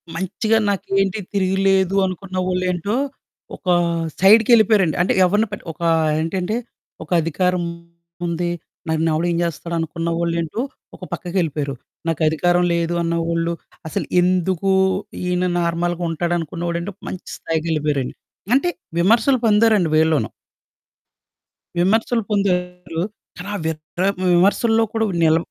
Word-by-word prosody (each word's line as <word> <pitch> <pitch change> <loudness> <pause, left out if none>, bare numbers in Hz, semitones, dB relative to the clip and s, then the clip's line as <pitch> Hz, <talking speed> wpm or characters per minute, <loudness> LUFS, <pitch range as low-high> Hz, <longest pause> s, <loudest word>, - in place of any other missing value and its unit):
మంచిగా 215 +5 0
"నాకేంటి 195 0 0
తిరిగులేదు" 195 -1 +2
అనుకున్న 185 0 -5
వాళ్ళు 185 0 0
ఏంటో, 180 +5 -2 0.6
ఒక 185 - -16 0.5
సైడ్‍కెళ్ళిపోయారండి. 215 -3 +5
అంటే 180 - +2
ఎవరిని 205 +5 +2
పట్టి 205 - -7
ఒక 170 - -19 0.4
ఏంటంటే 180 +5 -1 0.5
"ఒక 155 - -17
అధికారముంది, 170 0 -3 0.4
నన్ను 160 +1 +1
ఎవడు 165 +3 0
ఏం 170 - 0
చేస్తాడు?" 170 0 -3
అనుకున్న 165 +1 -3
వాళ్ళేంటో 170 +4 -1 0.4
ఒక - - -14
పక్కకెళ్ళిపోయారు. 155 -6 -2 0.3
నాకు 165 -1 -1
అధికారం 175 +3 +2
లేదు 170 0 0
అన్నవాళ్ళు, 170 0 0 0.3
అసలు 160 - -2 0.2
ఎందుకు 185 +1 +1 0.5
ఈయన 180 0 0
నార్మల్‍గా 175 +1 -1
ఉంటాడనుకున్నవాడు 170 0 -2
ఏంటో 200 +4 -5 0.2
మంచి 185 - -8
స్థాయికెళ్ళిపోయారండి. 155 -4 -1 0.4
అంటే 350 +6 +2 0.3
విమర్శలు 235 +8 +4
పొందారండి 210 -4 +4
వీళ్ళోనూ. 160 -1 +2 1.5
విమర్శలు 225 +6 +2
పొందారు. 180 -4 -1 0.4
ఆలా 200 +3 -5
వీర్ 160 -1 -2 0.3
ఆహ్, 200 - +2 0.2
విమర్శల్లో 225 +5 +3
కూడా 225 -1 +1 0.2
నిల 160 0 +5
175 Hz, 110 wpm, -20 LUFS, 165-195 Hz, 1.5 s, సైడ్‍కెళ్ళిపోయారండి